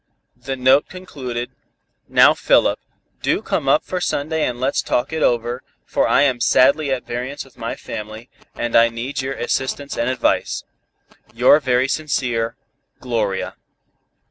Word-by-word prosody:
The 135 - -5
note 130 +2 +3
concluded: 130 -10 -6 0.6
"Now, - - +6
Philip, - - +2 0.4
do - - 0
come - - -1
up - - +4
for 180 -1 -3
Sunday 155 0 -1
and 120 -1 -4
let's 130 +2 0
talk 125 +5 -1
it 160 - -2
over, 120 0 +1 0.2
for - - +1
I 140 - +4
am 130 -4 +1
sadly 135 +4 +4
at 130 -2 -2
variance 125 +4 -5
with 135 - -20
my 115 -2 -4
family, 110 +1 -8 0.3
and 120 0 -2
I 115 0 +6
need 120 +5 -4
your 135 +1 -4
assistance 135 +3 -2
and 120 +1 +1
advice. 130 -1 0 0.7
"Your 125 +5 +6
very 130 -2 +1
sincere, 125 -6 -1 0.4
"GLORIA." 110 -6 -2
130 Hz, 145 wpm, -20 LUFS, 120-140 Hz, 0.7 s, Now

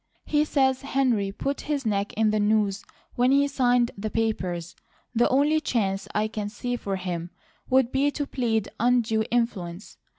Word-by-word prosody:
He 300 0 +2
says 265 -3 +2
Henry 255 -8 +1
put 275 +7 -3
his 285 -4 -1
neck 205 -2 0
in 215 -1 +2
the 215 - +1
noose 205 -1 +1 0.3
when 245 +1 +2
he 280 +1 +4
signed 245 -3 +2
the 215 +2 -4
papers. 185 -6 -2 0.4
The 240 0 +3
only 290 +4 +3
chance 195 -9 -1
I 210 +1 +2
can 210 -1 -4
see 245 +3 -3
for 200 -5 -3
him 175 -2 -4 0.4
would 260 -1 +3
be 275 +2 +2
to 290 0 -3
plead 225 -6 -1
undue 225 -2 +2
influence. 205 -6 -2
225 Hz, 165 wpm, -26 LUFS, 205-265 Hz, 0.4 s, he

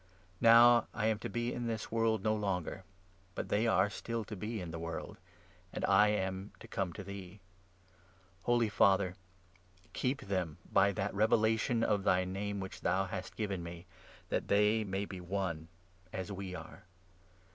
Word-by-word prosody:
Now 115 0 +7
I 110 - 0
am 110 -1 +2
n - - -16
to - - -5
be 120 +1 -2
in 120 -1 -3
this 110 -2 -3
world 115 -1 +1
no 110 -1 +2
longer, 95 -2 -2 0.5
but - - -4
they 110 +3 +2
are 110 - +4
still 115 +3 -4
to 105 - -6
be 110 +3 -4
in 90 -3 -6
the 80 - -5
world, 85 0 -5 0.5
and - - -2
I 100 +2 +6
am 95 -1 -2
to 115 - -11
come 95 -5 -2
to 100 - -7
thee. 100 0 -8 1.1
Holy 120 -1 +3
Father, 95 -3 +3 0.8
keep 130 +2 -1
them 90 -6 -2
by 100 +1 +4
that 100 -1 -2
revelation 110 +2 +2
of 100 -3 +1
thy 90 0 +3
Name 100 +2 -3
which 95 -1 -7
thou 95 +2 +1
hast 95 -1 -6
given 100 -4 -2
me, 85 +1 -8 0.4
that - - -1
they 105 +2 +3
may 100 0 -2
be 95 -2 -7
one, 90 -3 -3 0.4
as 95 +2 -4
we 95 -2 -5
are. 95 - -10
100 Hz, 170 wpm, -33 LUFS, 95-110 Hz, 1.1 s, Now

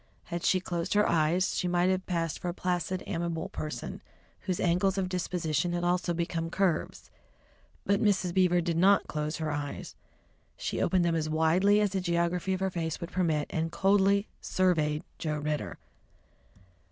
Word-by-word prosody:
Had 170 -1 -5
she 185 - +3
closed 175 +1 -3
her 210 - +4
eyes, 170 +3 +2
she 180 - 0
might 175 +1 +2
have 185 0 -2
passed 165 -3 -1
for 180 - -3
a 175 - -4
placid, 180 0 -2
amiable 170 -2 -3
person, 150 -6 -5 0.4
whose 185 -2 -3
angles 180 +2 +2
of 190 -1 0
disposition 175 -2 -1
had 175 0 -1
also 175 0 +1
become 170 -1 -2
curves. 180 -3 -1 0.7
But 200 0 +2
Mrs. 190 -4 +2
Beaver 180 -1 +3
did 165 -1 -1
not 195 +3 +5
close 150 0 -3
her 155 -1 -2
eyes. 145 -1 -5 0.6
She - - -3
opened 185 -2 +2
them 170 - +2
as 155 -1 -1
widely 170 +6 +3
as 205 -2 +1
the 190 -1 -1
geography 170 +1 0
of 185 - -6
her 190 0 0
face 165 -2 -3
would 170 - -6
permit, 160 -5 +1
and 165 0 -1
coldly 200 +1 +3
surveyed 155 -5 +1 0.2
Joe 155 -2 -2
Ridder. 150 0 -3
175 Hz, 170 wpm, -29 LUFS, 165-185 Hz, 0.7 s, not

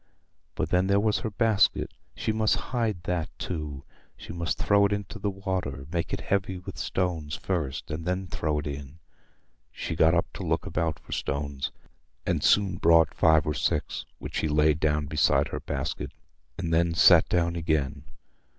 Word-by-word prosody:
But - - -1
then 90 +1 +2
there 100 0 +4
was 105 0 +2
her 110 - -3
basket—she 110 0 0
must 110 0 +2 0.2
hide 110 -8 0
that 90 -3 -1
too. 75 -5 -5 0.3
She - - -9
must 85 0 -2
throw 100 -1 +4
it - - -8
into 100 0 -3
the 105 - -1
water—make 90 -5 -3
it - - -2
heavy 95 -1 -1
with 90 - -9
stones 85 -5 -2
first, 75 -9 -3
and 80 +2 -4
then 90 +2 -1
throw 75 -3 -2
it 75 - -3
in. 70 +1 -6 0.7
She 80 - -4
got 80 +2 +4
up 85 - +2
to - - -6
look - - 0
about 80 -1 -1
for - - -16
stones, 70 -1 -2 0.5
and - - 0
soon 95 -4 +3
brought 85 -1 +5
five 80 -2 +4
or 75 - 0
six, 75 - -1
which - - -6
she - - 0
laid 75 0 +3
down 75 -1 +1
beside 70 -1 +2
her - - -4
basket, - - -3 0.5
and 85 -2 -2
then 85 0 +2
sat - - +7
down 85 -1 +1
again. 75 -4 -1
85 Hz, 170 wpm, -27 LUFS, 75-95 Hz, 0.7 s, sat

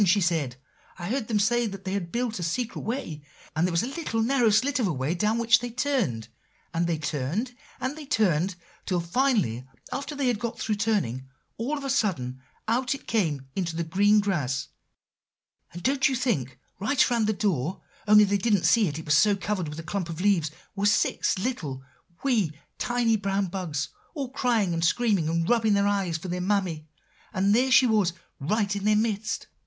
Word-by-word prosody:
she 200 +2 +4
said; 165 -9 0 0.4
'I 175 0 -5
heard 245 -2 -1
them 220 - +1
say 235 +3 +2
that 195 -1 -8
they 190 - -2
had 175 -4 -3
built 235 -3 -2
a - - -4
secret 220 +8 -2
way;' 220 - -4 0.3
and 165 +3 +2
there - - -2
was 170 +3 +1
a - - -2
little 265 -6 -2
narrow 245 -1 +3
slit 255 +6 +2
of 230 - +2
a - - 0
way, 135 +2 -1
down 210 +5 +1
which 235 0 +5
they 245 0 -4
turned; 225 - -1 0.5
and 170 0 +1
they 170 -2 0
turned, 155 - -2 0.2
and 260 +3 -2
they 305 -2 -9
turned, 185 - +2 0.3
till 180 -3 +1
finally 170 - +1 0.3
after 280 +2 -4
they 280 -1 -1
had 245 -4 +1
got 235 -1 -4
through 220 - -1
turning, 195 - -1 0.3
all 275 +7 -1
of 280 - -7
a 275 - -3
sudden 130 - -1 0.3
out 250 +4 +1
it 275 - -12
came 155 - 0
into 170 -4 -2
the 170 - -1
green 205 +6 +4
grass; 140 -11 -1 1.0
and, 175 +2 -9
don't 275 +2 +3
you 265 - 0
think, 160 - -1 0.2
right 250 +5 +2
around 230 -3 +2
the - - +3
door, 185 - -1 0.3
only 210 0 +8
they 200 0 +1
didn't 205 -2 +2
see 225 -4 +5
it, 150 -1 -3
it 160 - -7
was 150 - +3
so 205 +6 +5
covered 195 -3 -2
with 150 - -7
a - - -6
clump 180 +1 -3
of 165 0 -6
leaves, 180 -5 +2 0.3
were 200 - -3
six 205 - +2
little, 165 - -3 0.4
wee, 225 - +2 0.3
tiny 240 -2 +2
brown 200 -1 0
bugs, 175 -5 -3 0.3
all 275 -4 -4
crying 235 -9 +1
and 165 0 -1
screaming 195 -3 +2
and 165 0 0
rubbing 225 -3 +3
their 200 0 +2
eyes 195 -5 0
for 165 - -8
their 180 0 -2
mammy, 180 -5 -1 0.4
and 195 +2 +2
there 255 +4 +3
she 260 0 +6
was 210 -7 +2 0.3
right 205 +7 0
in 200 - -4
their 215 0 +4
midst." 215 0 -1
200 Hz, 200 wpm, -26 LUFS, 170-235 Hz, 1.0 s, only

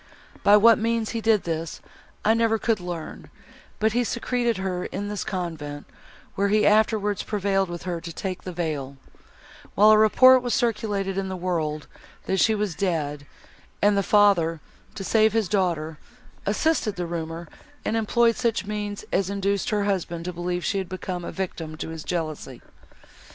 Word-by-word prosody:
By 205 +1 +7
what 230 +2 +6
means 230 0 0
he 230 - -3
did 220 -2 +3
this, 165 -1 -4 0.5
I 220 - +5
never 225 -1 +2
could 220 -1 0
learn; 175 -3 -7 0.5
but 220 0 +1
he 245 +1 +2
secreted 240 -1 -1
her 185 -1 -3
in 205 +2 -4
this 205 -1 -3
convent, 160 -6 -5 0.5
where 200 +1 +1
he 210 +1 +3
afterwards 210 -1 +2
prevailed 195 -2 0
with 175 -1 -6
her 175 -2 -3
to 170 - -7
take 185 +2 -5
the 185 - -6
veil, 150 -6 -4 0.8
while 210 +2 +7
a 215 - +7
report 255 +4 +7
was 245 -3 -1
circulated 205 -4 -1
in 190 -1 -3
the 190 - -3
world, 160 -4 -2 0.4
that 190 - 0
she 220 - +4
was 210 -4 -1
dead, 150 -6 -2 0.5
and 205 0 +3
the 200 - +3
father, 190 -6 +3 0.4
to 195 - -5
save 220 +1 +3
his 225 -3 +1
daughter, 170 -5 -1 0.5
assisted 215 0 +1
the 180 - -3
rumour, 165 0 -5 0.4
and - - 0
employed 230 +1 +2
such 230 -4 -1
means 205 -1 -4
as 190 0 +1
induced 200 +1 -1
her 210 -2 +1
husband 175 -4 -2
to 180 - -4
believe 175 +1 -3
she 200 - 0
had 190 -2 -5
become 185 -1 -5
a - - -5
victim 165 -4 -5
to 160 - -5
his 160 -1 -7
jealousy. 155 -7 -4
195 Hz, 170 wpm, -25 LUFS, 170-215 Hz, 0.8 s, By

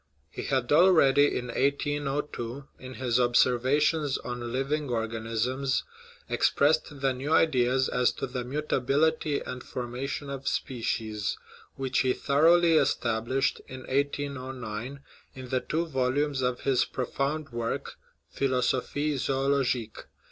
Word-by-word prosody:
He - - -6
had 130 -3 0
already, 145 -4 +5
in 125 0 -5
1802, 140 -1 -2
in 130 0 -9
his 125 -2 0
Ob 120 -1 +1
servations 140 +4 +3
on 120 -1 -4
Living 140 +3 -1
Organisms, 115 +3 -1 0.4
expressed 145 -1 +1
the 135 -1 +2
new 135 +4 -4
ideas 130 -5 +3
as 125 -1 +2
to - - -4
the 125 -1 -4
mutability 145 +2 0
and 125 0 -6
formation 125 +4 -5
of 135 0 -6
species, 110 -4 -2 0.4
which 135 -1 -1
he 130 -1 +2
thoroughly 165 +3 +4
established 125 -2 0
in 130 0 -8
1809 130 -3 -3 0.3
in 130 -1 -9
the 130 - +1
two 165 +2 -1
vol 130 -5 0
umes 145 -1 0
of 125 -1 -1
his 135 -2 +2
profound 140 +4 -3
work, 115 -1 -3 0.4
Philosophic 135 +2 0
Zoologique. 135 -4 0
130 Hz, 120 wpm, -28 LUFS, 125-145 Hz, 0.4 s, already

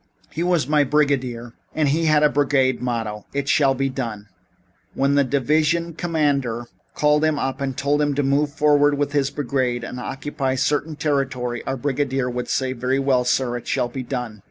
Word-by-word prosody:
"He 165 - -4
was 175 -6 +1
my 150 0 +3
brigadier, 130 -5 0 0.2
and 155 -3 +2
he 160 +4 +1
had 155 -1 +4
a 150 - +6
brigade 135 -3 +1
motto: 110 -4 -3
It 140 0 -2
shall 140 -1 +3
be 135 +1 0
done. 115 -6 -5 0.7
When 140 +1 +2
the 140 0 +4
divisional 155 +5 +1
commander 145 -8 -1 0.3
called 150 0 +3
him 155 -1 +2
up 135 0 -3
and 135 -2 -3
told 145 +2 +1
him 145 -1 +1
to 145 - +1
move 140 +2 +1
forward 145 -1 +3
with 145 0 -1
his 140 -2 +1
brigade 130 -4 -1
and 125 +1 -6
occupy 135 +1 -3
certain 145 +4 0
territory, 135 -5 -1
our 135 - -1
brigadier 135 -1 -1
would 125 0 -4
say: 130 -1 0
'Very 130 +2 -1
well, 135 -2 +2
sir. 125 0 0
It 120 - -10
shall 120 - 0
be 130 +2 -5
done.' 125 -4 -5
135 Hz, 185 wpm, -22 LUFS, 125-145 Hz, 0.7 s, a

